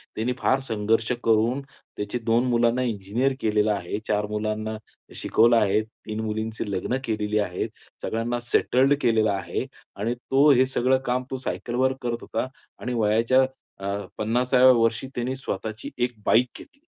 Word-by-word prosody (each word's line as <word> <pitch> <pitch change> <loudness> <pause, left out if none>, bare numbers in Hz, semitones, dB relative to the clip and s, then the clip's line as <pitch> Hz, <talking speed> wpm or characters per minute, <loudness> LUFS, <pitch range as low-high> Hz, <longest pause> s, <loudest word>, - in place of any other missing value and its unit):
त्यानी 115 +3 -1
फार 135 0 +2
संघर्ष 110 +1 +1
करून 115 +4 +2
त्याचे 125 -4 -7
2 115 +2 +3
मुलांना 120 +1 +2
इंजिनिअर 115 +4 0
केलेला 105 -1 +2
आहे, 100 0 -3
4 105 0 +1
मुलांना 110 +1 -2 0.4
शिकवलं 115 +2 +3
आहे, 105 -1 +3
3 110 -1 -8
मुलींची 110 0 -3
लग्न 100 +6 -1
केलेली 105 -1 0
आहेत, 90 -3 -2 0.3
सगळ्यांना 115 +2 -1
सेटल्ड 135 +3 +4
केलेलं 110 -2 +3
आहे 100 -1 -3 0.3
आणि 115 +4 -2
तो 135 +4 +3
हे 130 -1 +5
सगळं 130 0 +2
काम 125 +1 0
तो 130 - -2
सायकलवर 130 0 -1
करत 120 -1 -1
होता - - -3 0.3
आणि 125 - -3
वयाच्या 115 +4 +3 0.4
अ, - - -2 0.3
50व्या 125 +4 +4
वर्षी 115 +2 +1
त्याने 125 +2 -2
स्वतःची 110 -4 -5 0.2
1 125 - -6
बाईक 125 +2 +4
घेतली. 280 - -15
115 Hz, 150 wpm, -25 LUFS, 110-125 Hz, 0.4 s, हे